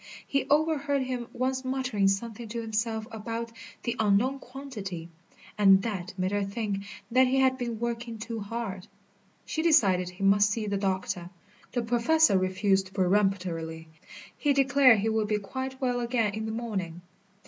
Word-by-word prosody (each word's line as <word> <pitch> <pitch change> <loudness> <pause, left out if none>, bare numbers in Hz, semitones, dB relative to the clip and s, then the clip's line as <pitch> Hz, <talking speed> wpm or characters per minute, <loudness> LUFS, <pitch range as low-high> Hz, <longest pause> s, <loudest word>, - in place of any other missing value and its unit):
She 275 -1 0
overheard 285 -2 +2
him 250 -2 -4
once 260 +1 -1
muttering 255 -6 0
something 225 +3 -2
to 230 +2 -4
himself 220 0 -2
about 230 +1 -5 0.3
"the 235 -1 -1
unknown 220 +6 +2
quantity," 210 -12 -7 0.5
and 195 -1 +6
that 190 -4 -4
made 185 +1 0
her 205 0 0
think 200 -1 -3 0.3
that 255 +2 +5
he 260 +1 +1
had 260 0 +4
been 240 -3 -4
working 235 -1 -3
too 225 +1 -5
hard. 205 -3 -5 0.6
She 315 - -2
decided 200 - +4
he 180 +2 -8
must 205 +1 +5
see 215 +1 -2
the 200 -1 -1
doctor. 190 -3 -2 0.4
The 245 -1 0
Professor 240 +4 +3
refused 190 0 +1
peremptorily. 180 -4 0 0.5
He 290 -2 +1
declared 275 -3 +5
he 220 - +1
would 220 -1 0
be 210 0 +1
quite 260 +6 -5
well 250 -2 0
again 235 -3 0
in 220 +1 -3
the - - -3
morning. 195 -7 -4
220 Hz, 160 wpm, -28 LUFS, 195-255 Hz, 0.6 s, and